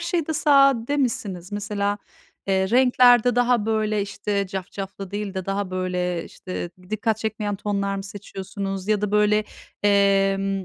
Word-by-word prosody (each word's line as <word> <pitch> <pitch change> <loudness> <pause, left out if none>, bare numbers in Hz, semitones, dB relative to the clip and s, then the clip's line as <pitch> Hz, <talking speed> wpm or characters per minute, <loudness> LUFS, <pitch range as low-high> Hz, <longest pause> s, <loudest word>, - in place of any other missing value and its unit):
şeyde 335 -2 -1
sade 275 -3 +4
misiniz? 205 -8 -2
Mesela, 205 0 -2 0.5
eee, 190 -1 +1
renklerde 245 -1 +5
daha, 245 -3 +2
böyle, 215 -1 0
işte, 200 0 -2
cafcaflı 195 0 -6
değil 205 -1 -4
de 190 -1 -4
daha, 195 -1 -2
böyle, 180 -2 -2
işte, 185 -2 -6 0.2
dikkat 215 0 0
çekmeyen 215 -2 -3
tonlar 200 -1 -2
mı 195 - -5
seçiyorsunuz? 195 0 -6
Ya 215 -2 +2
da, 210 -1 -1
böyle, 210 0 +3 0.4
emm, 195 -1 +2
205 Hz, 135 wpm, -23 LUFS, 195-220 Hz, 0.5 s, renklerde